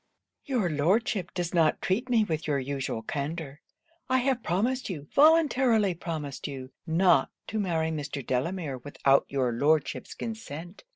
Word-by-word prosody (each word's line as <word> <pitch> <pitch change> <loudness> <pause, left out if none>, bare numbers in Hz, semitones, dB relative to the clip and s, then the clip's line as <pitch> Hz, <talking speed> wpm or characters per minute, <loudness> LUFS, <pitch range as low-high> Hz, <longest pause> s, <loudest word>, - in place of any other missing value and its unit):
'Your 245 -9 0
Lordship 175 +4 +1
does 175 -1 -2
not 165 -3 +3
treat 230 +8 -1
me 230 -3 +4
with 160 -6 -3
your 145 -2 +1
usual 135 -4 -3
candour. 145 +3 -4 0.5
I 260 - +4
have 255 -1 +1
promised 225 +9 0
you, 150 -6 -6
voluntarily 265 - +4
promised 160 -5 -5
you, 130 -2 -7 0.2
not 165 -3 +4 0.2
to 220 - -2
marry 165 -5 0
Mr. 145 -3 -4
Delamere 140 +2 -2
without 140 +1 +2
your 130 -3 0
Lordship's 145 +5 0
consent. 180 -6 -7
165 Hz, 140 wpm, -28 LUFS, 145-215 Hz, 0.5 s, me